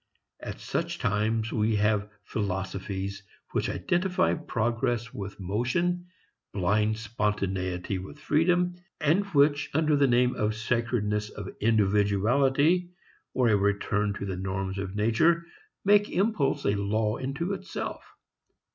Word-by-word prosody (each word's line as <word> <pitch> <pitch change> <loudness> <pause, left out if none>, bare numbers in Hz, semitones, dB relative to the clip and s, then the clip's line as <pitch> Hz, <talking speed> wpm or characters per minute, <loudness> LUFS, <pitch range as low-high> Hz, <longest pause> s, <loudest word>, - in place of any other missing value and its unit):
At - - -7
such - - -2
times 110 +2 0
we 110 0 +2
have 105 0 +1
philosophies 95 -1 -3 0.3
which - - 0
identify 180 0 +1
progress 120 -4 -1
with 100 0 -7
motion, 125 - -1 0.5
blind 105 +3 +1
spontaneity 100 -4 -2
with 95 +11 -9
freedom, 175 +4 +2 0.2
and 160 +6 +3
which 145 -5 +3
under 155 -1 +3
the 140 -1 +4
name 125 0 +3
of 105 0 0
the - - -9
sacredness 110 -2 -1
of 100 -3 -7
individuality 115 - +3 0.5
or 125 -2 +3
a 105 - +5
return 100 +1 +1
to 100 - -5
the 95 -2 -3
norms 95 +1 -3
of 95 0 -4
nature 160 +11 +3 0.4
make 205 +1 +5
impulse 170 -8 +1
a 100 - +3
law 105 +2 0
unto 140 +8 -2
itself. 195 0 -5
110 Hz, 125 wpm, -28 LUFS, 100-145 Hz, 0.5 s, a